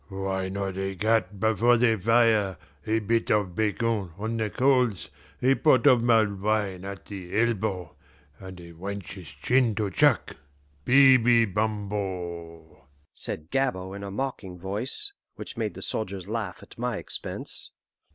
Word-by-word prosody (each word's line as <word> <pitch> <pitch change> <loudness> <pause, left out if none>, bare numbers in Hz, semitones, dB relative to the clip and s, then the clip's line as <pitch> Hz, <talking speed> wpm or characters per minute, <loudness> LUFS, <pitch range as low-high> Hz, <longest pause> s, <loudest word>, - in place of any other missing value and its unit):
"Why 95 -1 -3
not 95 -1 -3
a 95 0 -3
cat 105 -1 0
before 110 +3 +3
the 115 -1 +3
fire, 110 -3 +3 0.3
a 110 +1 +2
bit 115 +1 0
of 100 -4 +1
bacon 110 -1 0
on 110 +3 -3
the 110 -1 -1
coals, 125 - +1 0.3
a 130 +2 +5
pot 140 -2 +3
of 130 -4 +6
mulled 110 -4 +2
wine 100 -3 0
at 100 -1 -7
the 100 0 -4
elbow, 105 -7 -1 0.4
and 95 -2 -10
a 85 -1 -11
wench's 95 0 -7
chin 125 - +1
to 105 -2 -1
chuck, - - +2 0.5
baby 125 -3 +6
bumbo!" 95 - -4 0.3
said 80 +1 -4
Gabord 100 -8 -1
in 100 - -8
a 100 - -5
mocking 100 -5 -4
voice, 110 - -2 0.2
which - - -6
made - - -3
the - - -5
soldiers 100 -4 -2
laugh 105 -5 -4
at - - -16
my 120 -2 -1
expense. - - -3
105 Hz, 145 wpm, -26 LUFS, 95-115 Hz, 0.5 s, of